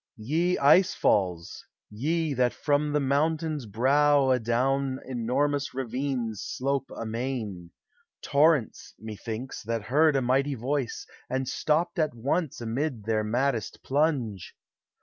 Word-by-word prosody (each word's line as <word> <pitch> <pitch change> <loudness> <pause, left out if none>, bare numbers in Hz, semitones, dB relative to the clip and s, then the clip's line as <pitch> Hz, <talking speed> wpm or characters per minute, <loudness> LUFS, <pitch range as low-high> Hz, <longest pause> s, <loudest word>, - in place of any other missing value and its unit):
Ye 160 +11 0
ice 180 +7 +5
falls! 90 -4 0 0.3
ve 155 +7 -1
that 125 -2 +1
from 145 0 +1
the 150 - +2
mountain's 150 0 0
brow 140 +5 +3
Adown 130 +3 +1 0.3
(mormons 145 +2 0
ravines 125 -4 -3
slope 135 +1 -2
amain, 110 -6 -4 0.3
— - - -41
Torrents, 150 -4 +2
methinks, 110 +3 -6
that 115 0 -3
heard 150 +6 +3
a 135 - +2
mighty 135 +3 +1
voice, 130 +1 -2 0.2
And 130 +1 -1
stopped 170 +6 0
at 155 -6 0
once 140 +5 -1
amid 120 +1 -2
their 110 0 0
maddest 120 +1 -1
plunge! 130 - -1
135 Hz, 120 wpm, -27 LUFS, 115-145 Hz, 0.3 s, ice